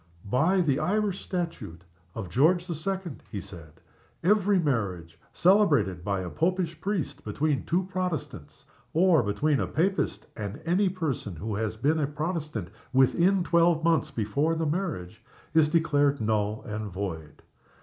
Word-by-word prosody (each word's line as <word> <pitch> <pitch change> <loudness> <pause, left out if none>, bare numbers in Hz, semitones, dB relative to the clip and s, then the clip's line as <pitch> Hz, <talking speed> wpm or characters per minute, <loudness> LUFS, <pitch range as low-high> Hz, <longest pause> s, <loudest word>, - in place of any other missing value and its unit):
"By 160 - +2
the 145 -5 +1
Irish 205 0 0
Statute 165 - -4 0.3
of 110 -5 -4
George 165 - +3
the 175 - -3
Second," 180 -1 -4
he 105 - -4
said, 85 -6 -11 0.5
"every 205 +1 +3
marriage 95 - -1
celebrated 145 - +3
by 100 0 -1
a 90 - -5
Popish 170 -1 -1
priest 195 -7 -3
between 140 +7 -1
two 180 +3 +1
Protestants, 185 -6 -5 0.3
or 170 -3 +5
between 130 +7 +1
a - - -1
Papist 190 +6 0
and 105 +4 -5
any 185 +4 +2
person 155 - -3
who 105 +7 -4
has 110 +1 -2
been 150 +7 +1
a 145 - +1
Protestant 150 - -3 0.2
within 170 +9 +3
twelve 170 -2 +3
months 165 -2 +2
before 140 +6 0
the 160 0 -1
marriage, 145 - -3 0.3
is 160 -2 +5
declared 145 -4 +2
null 105 -1 0
and 105 -1 -5
void. 85 -5 -6
150 Hz, 145 wpm, -27 LUFS, 105-175 Hz, 0.5 s, or